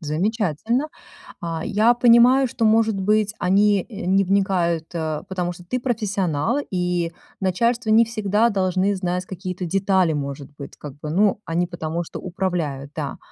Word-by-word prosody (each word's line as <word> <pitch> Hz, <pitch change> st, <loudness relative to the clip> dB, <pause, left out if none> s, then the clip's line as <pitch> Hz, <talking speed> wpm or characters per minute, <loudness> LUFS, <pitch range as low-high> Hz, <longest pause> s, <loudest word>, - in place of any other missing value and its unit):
Замечательно. 205 Hz, -, -1 dB, 0.5 s
А, 165 Hz, -1 st, -4 dB
я 220 Hz, +4 st, +3 dB
понимаю, 245 Hz, +2 st, +5 dB
что, 230 Hz, -, -3 dB
может 220 Hz, 0 st, +4 dB
быть, 210 Hz, +1 st, +1 dB
они, 200 Hz, +2 st, +3 dB
э, 205 Hz, -5 st, -7 dB
не 195 Hz, +2 st, +3 dB
вникают, 180 Hz, -4 st, +1 dB
э, 155 Hz, -2 st, -3 dB
потому 180 Hz, -2 st, -2 dB
что 175 Hz, 0 st, -11 dB
ты 250 Hz, +8 st, -2 dB
профессионал, 210 Hz, -, -1 dB
и 180 Hz, -2 st, -1 dB, 0.3 s
начальство 230 Hz, +5 st, 0 dB
не 225 Hz, +2 st, +6 dB
всегда 215 Hz, 0 st, +1 dB
должны 190 Hz, 0 st, +1 dB
знать 180 Hz, -1 st, -2 dB
какие-то 185 Hz, -1 st, -5 dB
детали, 190 Hz, -1 st, +2 dB
может 140 Hz, -1 st, -5 dB
быть, 140 Hz, -, -9 dB
как 145 Hz, -3 st, -8 dB
бы. 150 Hz, -, -6 dB
Ну, 205 Hz, +4 st, +2 dB
они 170 Hz, +2 st, 0 dB
потому 170 Hz, -1 st, -4 dB
что -, -, -8 dB
управляют, 170 Hz, -7 st, -3 dB
да. 145 Hz, -3 st, -4 dB
190 Hz, 155 wpm, -22 LUFS, 170-215 Hz, 0.5 s, не